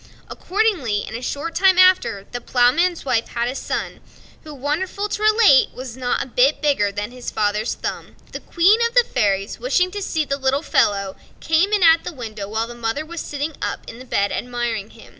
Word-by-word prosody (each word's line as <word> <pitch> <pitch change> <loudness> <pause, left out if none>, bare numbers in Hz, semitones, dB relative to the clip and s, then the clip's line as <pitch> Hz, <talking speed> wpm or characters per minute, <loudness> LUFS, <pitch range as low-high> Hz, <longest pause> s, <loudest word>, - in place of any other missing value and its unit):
Accordingly, 360 - -1
in - - -8
a 235 - -5
short 290 +6 -4
time 380 0 +4
after, 370 - +4
the 245 - -5
Ploughman's 275 +10 +2
wife 230 -4 0
had 235 0 -2
a 250 - -2
son, - - -4 0.4
who, 310 - -10
wonderful 310 +9 -3
to 420 - -4
relate! 430 -10 +5
was 255 -2 -8
not 250 -1 -1
a - - -11
bit 260 +4 +2
bigger 275 -9 +1
than 205 +3 -5
his 250 -1 -7
father's 210 +1 -1
thumb. - - -6 0.2
The - - -6
Queen 375 +6 +3
of 470 - -11
the - - +6
fairies, 200 - -1
wishing 365 -7 +1
to 410 +1 -5
see 315 -5 -1
the 275 -1 -2
little 270 +2 0
fellow, 200 -11 +1 0.2
came 325 +6 +1
in 415 -3 +2
at 325 0 +6
the - - -6
window, 215 -7 -7
while 220 +2 -1
the 240 - -9
mother 235 +6 -3
was 340 +1 -6
sitting 295 +2 -4
up - - -4
in 240 +3 -9
bed 200 -3 0
admiring 240 -4 -3
him. 225 - -16
270 Hz, 200 wpm, -21 LUFS, 230-345 Hz, 0.4 s, the